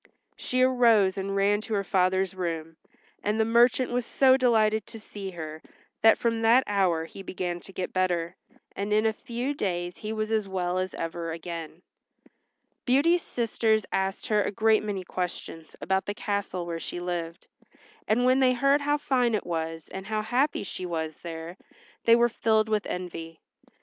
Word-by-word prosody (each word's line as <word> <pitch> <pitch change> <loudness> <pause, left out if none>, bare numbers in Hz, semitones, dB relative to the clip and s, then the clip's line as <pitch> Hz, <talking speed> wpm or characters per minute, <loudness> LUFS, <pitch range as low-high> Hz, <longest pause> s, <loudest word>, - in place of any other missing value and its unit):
She 255 0 0
arose 230 -7 +4
and 195 0 -3
ran 200 +1 +2
to 220 0 -3
her 200 - 0
father's 190 0 +1
room, 165 -3 -4 0.5
and 210 +2 -1
the 220 - +3
merchant 240 +2 +3
was 245 0 0
so 260 +2 +4
delighted 220 -4 +2
to 225 - -9
see 205 -2 -7
her 160 -3 -7 0.4
that 225 - +6
from 230 -1 0
that 235 +3 +5
hour 185 -5 +1
he 195 - -10
began 180 -2 -4
to 195 - -12
get 185 -1 -4
better, 180 -2 0 0.4
and 200 +1 -3
in 215 +1 +3
a 220 - +2
few 240 +5 -4
days 175 -8 -3
he 215 - -5
was 215 0 -2
as 215 -2 +1
well 185 -1 -1
as 185 0 -3
ever 165 0 -4
again. 165 0 -7 1.0
Beauty's 310 +7 +3
sisters 220 -4 0
asked 190 +1 -1
her 210 -1 +2
a - - 0
great 220 +1 +3
many 205 -3 -3
questions 175 -3 -5
about 190 0 -1
the 205 - -2
castle 200 -4 -3
where 170 -1 -4
she 175 - -5
lived, 175 -1 -4 0.6
and 235 +4 +2
when 255 +1 +4
they 255 -1 +4
heard 275 +3 +3
how 290 +1 +1
fine 250 -5 +1
it 210 - -3
was, 165 -2 -4
and 190 0 -7
how 215 0 -1
happy 260 +6 +1
she 185 - -6
was 160 -2 -3
there, 165 +1 -7 0.5
they 230 - +7
were 240 0 +4
filled 220 -1 +1
with 215 -1 0
envy. 165 -2 -6
200 Hz, 180 wpm, -27 LUFS, 175-230 Hz, 1.0 s, they